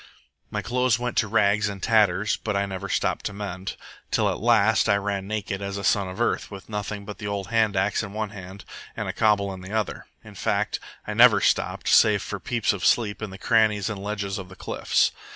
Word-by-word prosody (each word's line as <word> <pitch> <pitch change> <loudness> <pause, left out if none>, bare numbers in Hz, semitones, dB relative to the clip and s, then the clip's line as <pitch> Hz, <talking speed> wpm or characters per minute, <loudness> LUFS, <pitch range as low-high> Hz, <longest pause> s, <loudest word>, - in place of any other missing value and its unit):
My - - -3
clothes 125 -1 +1
went 125 0 -3
to 110 - +3
rags 105 -1 +2
and 100 -1 -6
tatters, 105 -2 +3
but 105 -2 -2
I 100 - +1
never 95 -2 -6
stopped - - 0
to 105 - -7
mend, 95 -2 -5 0.3
till - - +2
at - - -4
last 110 -1 +3
I 100 - +5
ran 100 -1 -2
naked 105 -2 -3
as 100 0 -4
a 100 - -5
son 100 0 +2
of 90 +4 -8
earth, 120 - 0
with 100 -2 -10
nothing 105 -1 -4
but 105 0 -8
the 105 - -5
old 100 -1 -3
hand 110 -2 +2
axe 100 +2 +1
in 105 -3 -6
one 110 0 -3
hand 95 -1 -10 0.3
and - - -3
a - - -3
cobble 100 -2 +2
in 95 - -9
the 95 +3 -9
other. 110 -2 -2 0.2
In - - -12
fact, - - -1 0.3
I - - -4
never - - +7
stopped, - - 0
save - - +5
for - - -5
peeps 120 -4 0
of 100 - -6
sleep 110 -3 +2
in 110 - -4
the 95 - -9
crannies 110 -2 +2
and 100 -2 -6
ledges 100 -1 -3
of 90 -1 -8
the 95 - -12
cliffs. - - +1
105 Hz, 225 wpm, -25 LUFS, 100-110 Hz, 0.3 s, never